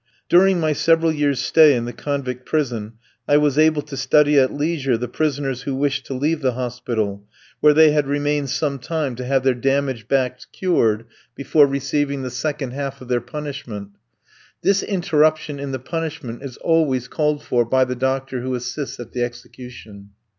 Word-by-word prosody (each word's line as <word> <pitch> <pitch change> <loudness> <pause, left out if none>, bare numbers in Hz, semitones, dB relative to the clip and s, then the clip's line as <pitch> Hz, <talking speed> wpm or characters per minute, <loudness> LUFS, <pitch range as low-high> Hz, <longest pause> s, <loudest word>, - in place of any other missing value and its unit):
During 185 +1 +5
my 155 -2 +1
several 165 +2 +3
years' 145 -3 0
stay 155 -3 +5
in 120 -1 -2
the 120 - -5
convict 130 -3 -4
prison 120 -9 -2 0.3
I 145 - +5
was 150 -1 +2
able 155 -1 +3
to 150 -1 -8
study 145 +2 +4
at 130 -1 +3
leisure 145 -4 0
the 125 +2 -4
prisoners 135 -1 -2
who 135 0 -3
wished 135 -1 -1
to 135 - -4
leave 155 +4 0
the 130 -2 +1
hospital, 120 -5 -3 0.4
where 150 -1 +5
they 160 -1 +7
had 150 -2 +1
remained 145 0 0
some 140 0 -1
time 155 -1 -2
to 125 - -5
have 135 0 +1
their 130 -1 +3
damaged 135 -2 -1
backs 130 -1 -1
cured 115 - +1 0.3
before 145 +1 +4
receiving 140 0 -1
the 125 - -4
second 135 0 -3
half 140 0 -5
of 125 - -11
their 120 -1 +1
punishment. 125 -6 -7 0.7
This 195 0 +3
interruption 155 -6 +1
in 140 -1 -4
the 130 - -2
punishment 150 -3 -5
is 135 -3 -8
always 145 -7 +1
called 150 +1 -1
for 120 -1 +1
by 130 +3 +2
the 125 0 -4
doctor 130 0 -2
who 130 +1 -2
assists 130 +3 -5
at 120 -1 -8
the 125 - -3
execution. 120 -4 -9
135 Hz, 180 wpm, -21 LUFS, 125-150 Hz, 0.7 s, they